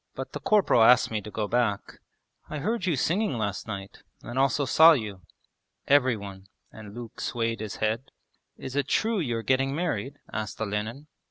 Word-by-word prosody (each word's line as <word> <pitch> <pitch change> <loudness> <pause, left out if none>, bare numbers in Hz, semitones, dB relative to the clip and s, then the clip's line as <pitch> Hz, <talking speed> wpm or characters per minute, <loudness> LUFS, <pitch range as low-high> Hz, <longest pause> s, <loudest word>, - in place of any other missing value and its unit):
'But - - -6
the - - -4
corporal 205 - +3
asked 120 +1 +6
me 110 -1 -1
to 105 - -9
go 105 0 -3
back.' 115 -3 -1 0.5
'I 155 - -4
heard 200 +7 -1
you 170 - +2
singing 170 - 0
last 105 -1 -3
night, 100 -2 -7 0.2
and 120 +2 -4
also 135 +1 +2
saw 160 +5 +7
you.' 105 -8 -4 0.7
'Every 130 -4 +4
one...' 100 -1 -10 0.2
and 105 -1 -11
Luke 120 -2 -9
swayed 115 -1 -2
his 110 -1 -5
head. 110 +4 -2 0.5
'Is 130 0 -7
it 140 -1 0
true 220 +4 +1
you 120 -9 -1
are 115 - -4
getting 135 +2 +1
married?' 145 - -2 0.2
asked 110 -1 -4
Olenin. 110 +6 -3
120 Hz, 180 wpm, -27 LUFS, 110-145 Hz, 0.7 s, saw